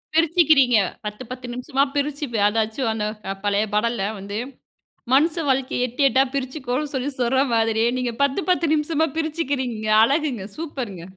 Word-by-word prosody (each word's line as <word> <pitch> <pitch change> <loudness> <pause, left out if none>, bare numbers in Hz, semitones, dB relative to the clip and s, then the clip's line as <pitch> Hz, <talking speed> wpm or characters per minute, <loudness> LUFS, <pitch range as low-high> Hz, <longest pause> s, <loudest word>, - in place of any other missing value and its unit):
பிரிச்சுக்கிறீங்க. 315 -7 +4 0.3
10, 210 +4 -5
10 255 0 -7
நிமிஷமா 265 +2 0
பிரிச்சு 290 +1 -1
ப்ப 220 - 0
அதாச்சும் 225 +3 0
அந்த 210 -1 -2 0.4
பழைய 205 +1 +1
பாடல்ல 210 -1 0
வந்து 200 +2 -6 0.8
மனுச 310 +5 +3
வாழ்க்கைய 260 -1 +1
எட்டு 250 +4 -5
எட்டா 265 +2 +4
பிரிச்சுக்கோன்னு 265 +1 -3
சொல்லி 265 +1 -1
சொல்ற 250 +2 +2
மாதிரியே 225 0 +2
நீங்க 250 -2 -2
10, 280 +3 +1
10 345 -2 +2
நிமிஷமா 315 +1 +1
பிரிச்சுக்கிறீங்க 280 -8 -2 0.2
அழகுங்க. 270 -5 0
சூப்பர்ங்க. 255 - -5
260 Hz, 140 wpm, -22 LUFS, 225-295 Hz, 0.8 s, பிரிச்சுக்கிறீங்க